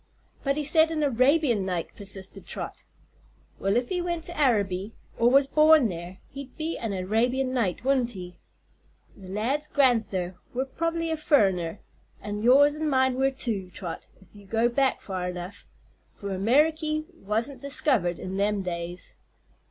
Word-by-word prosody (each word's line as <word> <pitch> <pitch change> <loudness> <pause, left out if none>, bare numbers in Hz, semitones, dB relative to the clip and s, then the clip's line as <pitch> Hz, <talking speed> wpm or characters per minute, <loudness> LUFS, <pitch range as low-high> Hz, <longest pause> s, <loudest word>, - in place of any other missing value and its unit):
"But 275 0 0
he 300 - -1
said 315 +2 +4
an 315 -2 -1
Arabian 260 -3 +3
Knight," 180 -3 -3
persisted 195 -1 -6
Trot. - - -7 0.7
"Well, 195 +3 +1
if 245 0 -1
he 360 -1 -1
went 345 -2 -3
to 345 +1 -5
Araby, 205 - +1 0.2
or 235 +1 +5
was 275 +2 +5
born 305 -3 +5
there, 175 +1 -7
he'd 275 -1 -9
be 320 +1 -2
an 225 -3 -4
Arabian 235 +8 0
Knight, 230 -3 -1
wouldn't 255 -3 +2
he? 180 -2 -9 0.8
The 190 - -13
lad's 240 +10 -1
gran'ther 220 -11 +1 0.2
were 260 +2 0
prob'ly 330 +4 -2
a 320 - -1
furriner, 195 - +2 0.4
an' 210 0 -5
yours 280 +5 +6
an' 310 0 -1
mine 260 -1 +3
were, 265 +1 +2
too, 230 -8 -3
Trot, 175 -4 -6
if 195 - -22
you 205 -1 -15
go 225 +3 +2
back 265 +2 +1
far 185 -2 -3
enough; 180 +2 -8 0.5
for 200 - -6
Ameriky 305 - +2
wasn't 225 +7 -2
diskivered 265 - +2
in 190 +1 -5
them 200 0 +1
days." 175 0 -5
240 Hz, 160 wpm, -26 LUFS, 195-285 Hz, 0.8 s, yours